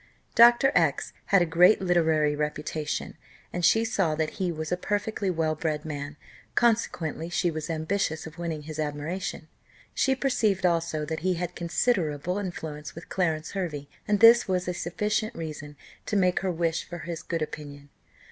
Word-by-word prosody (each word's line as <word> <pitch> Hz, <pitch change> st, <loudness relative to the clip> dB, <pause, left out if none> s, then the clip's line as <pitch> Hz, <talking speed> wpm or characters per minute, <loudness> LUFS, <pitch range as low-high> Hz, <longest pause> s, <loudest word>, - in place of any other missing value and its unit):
Dr. 240 Hz, +3 st, +7 dB
X -, -, +1 dB
had 195 Hz, -3 st, +4 dB
a -, -, 0 dB
great 175 Hz, +5 st, +5 dB
literary 160 Hz, -5 st, +2 dB
reputation, 150 Hz, 0 st, -3 dB, 0.4 s
and 175 Hz, -, -3 dB
she 225 Hz, +6 st, +4 dB
saw 190 Hz, -8 st, +1 dB
that 155 Hz, 0 st, -1 dB
he 180 Hz, -2 st, +1 dB
was 155 Hz, 0 st, -5 dB
a -, -, +3 dB
perfectly 205 Hz, +2 st, -2 dB
well 160 Hz, -3 st, 0 dB
bred 155 Hz, -1 st, -2 dB
man; 145 Hz, -1 st, -5 dB, 0.4 s
consequently 175 Hz, -9 st, +1 dB
she 175 Hz, 0 st, +1 dB
was 155 Hz, +1 st, -5 dB
ambitious 160 Hz, 0 st, -1 dB
of 160 Hz, +1 st, -10 dB
winning 165 Hz, -3 st, -3 dB
his 155 Hz, +1 st, -7 dB
admiration. 155 Hz, +3 st, -3 dB, 0.5 s
She 265 Hz, 0 st, +2 dB
perceived 215 Hz, -8 st, +1 dB
also 165 Hz, -3 st, +1 dB
that 160 Hz, +1 st, -3 dB
he 185 Hz, +2 st, 0 dB
had 175 Hz, 0 st, -3 dB
considerable 170 Hz, -, 0 dB
influence 155 Hz, -6 st, -6 dB
with 170 Hz, +3 st, -10 dB
Clarence 160 Hz, -4 st, -1 dB
Hervey, 160 Hz, -7 st, -4 dB, 0.2 s
and 210 Hz, -1 st, +2 dB
this 230 Hz, +1 st, +8 dB
was 185 Hz, -1 st, 0 dB
a 180 Hz, -, -1 dB
sufficient 210 Hz, +6 st, -2 dB
reason 150 Hz, -2 st, -7 dB, 0.3 s
to 210 Hz, -, -1 dB
make 180 Hz, -2 st, +3 dB
her 190 Hz, 0 st, -1 dB
wish 165 Hz, -1 st, -1 dB
for 175 Hz, -, -8 dB
his 170 Hz, 0 st, -6 dB
good 165 Hz, -2 st, -2 dB
opinion. 145 Hz, -2 st, -8 dB
170 Hz, 165 wpm, -27 LUFS, 155-190 Hz, 0.5 s, this